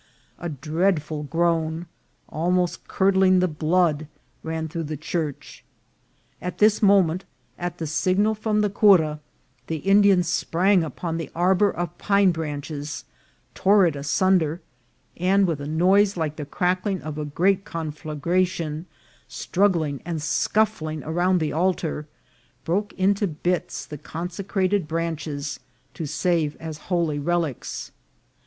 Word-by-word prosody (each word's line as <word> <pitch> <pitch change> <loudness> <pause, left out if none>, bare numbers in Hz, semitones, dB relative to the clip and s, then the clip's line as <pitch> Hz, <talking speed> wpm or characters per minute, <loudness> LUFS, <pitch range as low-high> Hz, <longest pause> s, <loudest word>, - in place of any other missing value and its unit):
A 175 - -4
dreadful 155 +1 -1
groan, 165 +1 0 0.4
almost 175 +2 -1
curdling 190 -1 +3
the 185 - +3
blood, 155 -1 +1 0.3
ran 160 0 -3
through 165 0 -4
the 155 0 -4
church. 155 -1 -4 0.8
At 180 0 -5
this 210 0 +4
moment, 195 -4 +4 0.3
at 175 0 -5
a 165 - -2
signal 185 +7 +1
from 215 0 0
the 210 - +2
cura, 175 -8 +4 0.5
the 165 - -2
Indians 195 +1 +4
sprang 180 +2 +2
upon 165 +1 -4
the 165 - -5
ar 180 +3 +3
bour 200 +2 +3
of 175 -2 -4
pine 200 -2 +4
branches, 150 -2 -5 0.5
tore 200 0 +4
it 165 -4 +1
asunder, 160 +3 +1 0.6
and 195 +3 +3
with 160 -5 -2
a 145 - -5
noise 190 +5 +3
like 155 -2 -2
the 150 - -5
crackling 185 +2 0
of 155 -1 -5
a - - -2
great 185 +6 +1
conflagration, 160 +1 -2 0.4
struggling 170 -8 0
and 165 -2 -3
scuffling 155 -2 0
around 175 +4 +1
the 155 -2 -1
altar, 165 -3 -1 0.6
broke 200 +5 0
into 200 +2 +1
bits 175 +2 -2
the 150 - -8
con 165 +3 -5
secrated 190 -1 -1
branches 150 -4 -3 0.3
to 160 - -5
save 165 -1 0
as 160 -1 -7
holy 170 -5 +1
relics. 165 -3 -2
170 Hz, 130 wpm, -24 LUFS, 155-185 Hz, 0.8 s, this